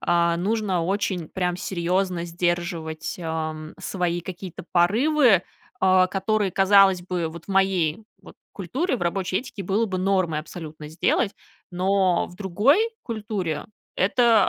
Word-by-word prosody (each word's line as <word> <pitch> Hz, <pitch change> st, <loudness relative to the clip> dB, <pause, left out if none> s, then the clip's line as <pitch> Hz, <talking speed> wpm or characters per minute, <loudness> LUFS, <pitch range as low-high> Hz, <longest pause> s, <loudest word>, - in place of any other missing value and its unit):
А, 170 Hz, -1 st, +2 dB
нужно 195 Hz, -1 st, 0 dB
очень 185 Hz, -2 st, -1 dB
прям 180 Hz, -2 st, -1 dB
серьёзно 180 Hz, -1 st, -1 dB
сдерживать, 170 Hz, -2 st, -2 dB
а, 160 Hz, -2 st, -2 dB
м, 155 Hz, 0 st, -9 dB
свои 175 Hz, -2 st, -2 dB
какие-то 180 Hz, -1 st, -8 dB
порывы, 220 Hz, -, +4 dB, 0.4 s
а, 185 Hz, -1 st, +5 dB
которые, 195 Hz, +2 st, 0 dB
казалось 195 Hz, -1 st, +5 dB
бы, 175 Hz, -2 st, -2 dB
вот 165 Hz, +1 st, -10 dB
в -, -, -34 dB
моей 190 Hz, -2 st, +1 dB, 0.2 s
вот -, -, -14 dB, 0.2 s
культуре, 255 Hz, -, -2 dB
в -, -, -6 dB
рабочей 185 Hz, +2 st, 0 dB
этике 235 Hz, -5 st, -7 dB
было 200 Hz, +5 st, +1 dB
бы 190 Hz, -3 st, -3 dB
нормой 185 Hz, -4 st, +1 dB
абсолютно 155 Hz, -2 st, -9 dB
сделать, 170 Hz, +5 st, +1 dB, 0.4 s
но 185 Hz, 0 st, +2 dB
в -, -, -14 dB
другой 210 Hz, -, +3 dB, 0.2 s
культуре- 205 Hz, -9 st, -3 dB, 0.3 s
это 225 Hz, +2 st, +4 dB
185 Hz, 135 wpm, -24 LUFS, 170-200 Hz, 0.4 s, а